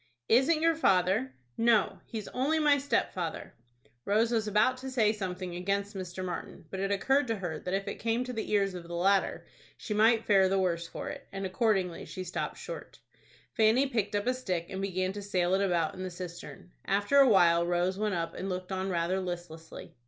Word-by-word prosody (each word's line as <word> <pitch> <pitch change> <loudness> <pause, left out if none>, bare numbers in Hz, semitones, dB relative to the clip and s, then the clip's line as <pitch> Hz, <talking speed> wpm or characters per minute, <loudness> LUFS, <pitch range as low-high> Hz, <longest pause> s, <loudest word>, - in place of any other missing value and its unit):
"Isn't 285 +7 +4
your 330 0 +5
father?" 185 - +2 0.3
"No, 230 -3 +3
he's 220 -3 -6
only 280 +5 0
my 295 -2 +4
stepfather." 185 - -2 0.5
Rose 220 +3 +2
was 220 -2 0
about 210 +5 +3
to 265 +1 -6
say 225 -5 +2
something 185 -3 -5
against 200 +3 -2
Mr. 185 0 -5
Martin; 180 -2 -6
but 190 - -4
it 195 +1 -1
occurred 270 +8 +2
to 225 - 0
her 175 -6 -4
that 180 +1 -2
if 195 +1 -3
it 200 - -5
came 230 +2 0
to 250 0 -6
the 220 - -4
ears 200 -2 +2
of 175 -2 -8
the 170 - -6
latter, 195 +3 +1 0.3
she 215 - -4
might 225 +2 +4
fare 195 -3 +4
the 195 - +1
worse 170 -3 0
for - - -6
it, - - -8
and 195 0 -4
accordingly 190 -3 0
she 185 - -6
stopped 180 +2 -4
short. - - -8 0.6
Fanny 225 +4 +4
picked 220 -6 -1
up 205 +1 0
a 250 - +2
stick, 185 -9 -3
and 190 0 -4
began 185 -1 -1
to 205 - -6
sail 185 -3 0
it 195 - +3
about 170 -4 +1
in 185 - -8
the 185 - -3
cistern. 175 0 -9
After 205 +8 +2
a 270 -2 +7
while 170 -5 +5
Rose 175 +2 0
went 210 -3 0
up, 165 -1 -3
and 195 - -5
looked 185 0 -4
on 190 0 -2
rather 175 +1 0
listlessly. 175 -3 -7
195 Hz, 205 wpm, -30 LUFS, 180-225 Hz, 0.6 s, a